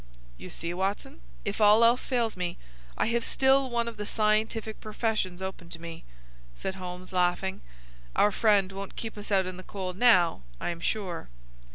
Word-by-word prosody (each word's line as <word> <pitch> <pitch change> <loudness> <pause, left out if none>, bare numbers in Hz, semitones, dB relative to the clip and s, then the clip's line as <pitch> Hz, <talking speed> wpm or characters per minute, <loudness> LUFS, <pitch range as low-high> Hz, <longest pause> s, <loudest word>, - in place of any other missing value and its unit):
"You - - -9
see, 170 +1 -4
Watson, 190 - -3 0.2
if - - -2
all 210 +2 +7
else 240 +2 +4
fails 235 -4 +1
me 180 -1 -3 0.4
I - - +2
have 235 +1 +1
still 265 +1 +3
one 235 -1 0
of 230 - -6
the 210 - -4
scientific 220 0 0
professions 215 -4 -2
open 190 -3 -6
to 165 - -8
me," 165 -1 -8 0.5
said 190 - -3
Holmes, 185 0 -8
laughing. 180 +1 +1 0.5
"Our 210 - +5
friend 200 -2 +3
won't 195 0 -7
keep 225 -1 -5
us 205 0 -8
out 190 -2 +4
in 185 0 -5
the - - -7
cold 185 -2 -5
now, 185 - +5 0.2
I - - -1
am 170 - -6
sure." 180 - -3
195 Hz, 180 wpm, -28 LUFS, 180-220 Hz, 0.5 s, all